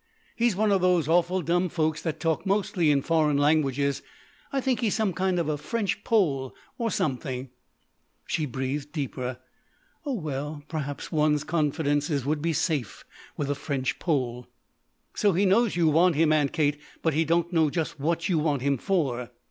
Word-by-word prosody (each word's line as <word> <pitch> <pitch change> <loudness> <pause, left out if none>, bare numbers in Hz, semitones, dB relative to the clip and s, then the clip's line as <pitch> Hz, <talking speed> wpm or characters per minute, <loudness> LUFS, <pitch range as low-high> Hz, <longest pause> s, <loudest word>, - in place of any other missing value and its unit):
He's 235 -4 +2
one 210 +1 +2
of 195 -2 +3
those 180 -4 +3
awful 175 +2 +2
dumb 175 +3 +1
folks 155 -1 -1
that 160 -3 -3
talk 165 -2 0
mostly 190 -4 +1
in 140 -2 +3
foreign 155 -3 +2
languages. 140 -2 +2 0.5
I 275 - 0
think 260 -2 0
he's 225 -5 +1
some 215 -4 0
kind 185 +1 0
of 170 -3 0
a 150 -1 -1
French 205 +2 -2
Pole 140 - +1 0.2
or 230 -1 0
something." 130 - -2 0.7
She 155 -2 -1
breathed 135 +3 -3
deeper. 130 -5 -4 0.7
"Oh, 285 -3 -2
well 150 - -4
perhaps 145 -3 -5
one's 150 -2 +2
confidences 145 -3 0
would 150 +1 0
be 165 +2 0
safe 145 - -2 0.3
with 145 -1 -1
a - - +2
French 140 -2 -3
Pole." 125 -7 -1 0.7
"So 205 -2 +2
he 190 +4 +2
knows 210 +2 +3
you 170 -2 +3
want 165 +2 +4
him, 155 0 +4
Aunt 145 -3 +2
Kate, 150 -2 0 0.2
but 160 - +2
he 160 +3 +2
don't 170 +2 0
know 160 -3 +3
just 160 -1 -3
what 165 +4 0
you 175 -4 +2
want 145 -4 0
him 140 -2 +1
for." 135 - -1
155 Hz, 175 wpm, -26 LUFS, 145-175 Hz, 0.7 s, want